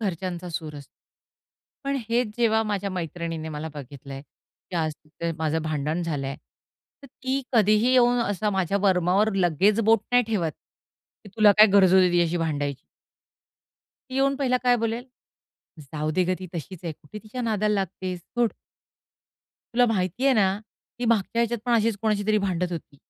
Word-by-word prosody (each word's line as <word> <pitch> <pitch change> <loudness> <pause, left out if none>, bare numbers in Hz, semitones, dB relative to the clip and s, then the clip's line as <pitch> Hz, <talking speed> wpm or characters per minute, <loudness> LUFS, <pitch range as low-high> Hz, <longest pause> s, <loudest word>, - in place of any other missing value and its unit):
घरच्यांचा 180 -3 -3
सूर 155 -2 -5
असतो. 140 - -12 0.9
पण 275 0 0
हेच 235 0 +1
जेव्हा 225 -2 +3
माझ्या 200 -2 -2
मैत्रिणीने 165 -2 -4
मला 155 +1 -5
बघितलंय, 140 -1 -9
की 160 +4 -13
आज 160 -2 0
तिथे 165 +2 -5
माझं 160 0 0
भांडण 155 +2 -2
झालंय, 140 -4 -3 0.7
तर 275 - -11
ती 265 +1 -3
कधीही 215 +1 +4
येऊन 245 -1 +4
असा 205 -1 -1
माझ्या 195 0 0
वर्मावर 190 +2 +3
लगेच 190 +4 +3
बोट 225 -1 +5
नाही 245 - +6
ठेवत, 185 -8 -1 0.7
की 205 - -11
"तुला 215 -2 +7
काय 215 - +10
गरज 190 -2 +6
होती 185 -1 +5
तिच्याशी 175 -1 +2
भांडायची." 145 -5 -2 1.3
ती - - -6
येऊन 275 +1 +2
पहिला 260 -2 +1
काय 245 -1 +4
बोलेल? 230 +1 -2 0.8
"जाऊ 150 +1 -4
दे 185 +4 +1
गं, 185 +1 0
ती 185 - -7
तशीच 170 +2 -6
आहे. 165 - -3
कुठे 150 +7 -12
तिच्या 235 +4 -6
नादाला 215 -2 +1
लागतेस? 185 -2 -3
सोड." 235 +6 -1 1.2
तुला 245 +1 +5
माहिती 200 +2 -1
आहे 275 - +5
ना, 195 -2 +2 0.4
ती 245 - -2
मागच्या 230 0 +1
ह्याच्यात 235 0 0
पण 245 - 0
अशीच 225 -2 +2
कोणाशीतरी 215 0 +1
भांडत 180 -3 -1
होती. 155 -4 -7
190 Hz, 160 wpm, -25 LUFS, 165-225 Hz, 1.3 s, काय